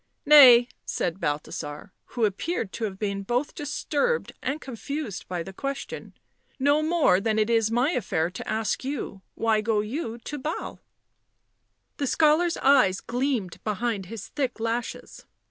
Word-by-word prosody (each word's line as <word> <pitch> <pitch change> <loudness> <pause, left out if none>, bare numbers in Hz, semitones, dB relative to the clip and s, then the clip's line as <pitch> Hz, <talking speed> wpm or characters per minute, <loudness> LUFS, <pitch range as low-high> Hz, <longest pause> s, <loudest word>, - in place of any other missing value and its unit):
u 295 - -6
Hay," 250 -5 +10 0.2
said 175 +1 -2
Balthasar, 145 +1 -4
who 235 -3 0
appeared 215 - -2
to 230 - -3
have 195 -3 -5
been 200 -1 -2
both 245 +8 -1
disturbed 295 - -1
and 275 +4 -2
confused 270 - -6
by 175 -2 -3
the 195 - -9
question, 275 +6 -5 0.2
" - - -40
no 295 +1 +4
more 310 - +3
than 220 +1 0
it 215 +1 +2
is 225 -2 +3
my 245 +7 +2
affair 175 - -1
to 190 - -8
ask 215 +1 -1
you 260 -7 -4
— - - -51
why 220 -1 +3
go 215 -1 +1
you 230 +1 -4
to 295 +5 -7
Basle?" 305 +5 -4 1.2
The 280 - -1
scholar's 320 +4 +3
eyes 230 -9 +4
gleamed 245 -7 -2
behind 215 -2 -2
his 225 0 -8
thick 260 -5 -2
lashes. 230 +1 -4
230 Hz, 160 wpm, -26 LUFS, 200-280 Hz, 1.2 s, Hay